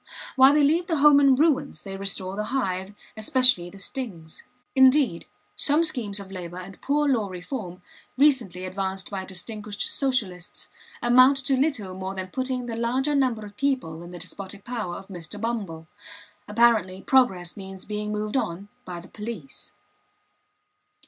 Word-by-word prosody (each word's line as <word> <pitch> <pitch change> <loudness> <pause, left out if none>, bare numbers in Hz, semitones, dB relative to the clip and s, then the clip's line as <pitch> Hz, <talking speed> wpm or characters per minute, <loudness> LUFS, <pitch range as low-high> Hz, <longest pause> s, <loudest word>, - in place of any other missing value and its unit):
While 265 +1 +7
they 300 - +4
leave 330 +5 +2
the 330 - 0
home 290 -1 +6
in 275 -2 +5
ruins, 285 - +1
they 195 -1 -7
restore 195 -1 0
the 210 +1 -2
hive, 195 -6 -2 0.2
especially 220 -4 +5
the 195 - -13
stings. 195 - -5 0.3
Indeed, 260 - +4 0.3
some 300 +3 +2
schemes 225 -11 0
of 195 -1 -10
labor 180 -2 -7
and 185 +1 -10
Poor 295 +1 +1
Law 235 -7 +1
reform 180 -1 -7 0.3
recently 245 - +3
advanced 190 0 -4
by 190 -2 -4
distinguished 205 +2 -4
Socialists, 210 -11 -2 0.3
amount 255 +3 +6
to 270 - +3
little 255 -9 0
more 190 +1 -5
than 185 -1 -5
putting 255 +3 -2
the 235 -1 -4
largest 260 +5 0
number 235 -5 0
of 205 0 -12
people 255 - -1
in 175 - -10
the 180 - -9
despotic 195 +3 -7
power 225 -8 -4
of 195 - -9
Mr. 180 +1 -8
Bumble. 205 -8 -3 0.6
Apparently, 210 -4 +2
progress 190 -10 +2
means 190 -1 -8
being 210 0 -3
moved 210 +1 -3
on 200 -5 -2 0.2
by 180 -2 -6
the 175 - -13
police. 210 -10 -7
210 Hz, 155 wpm, -25 LUFS, 185-260 Hz, 0.6 s, While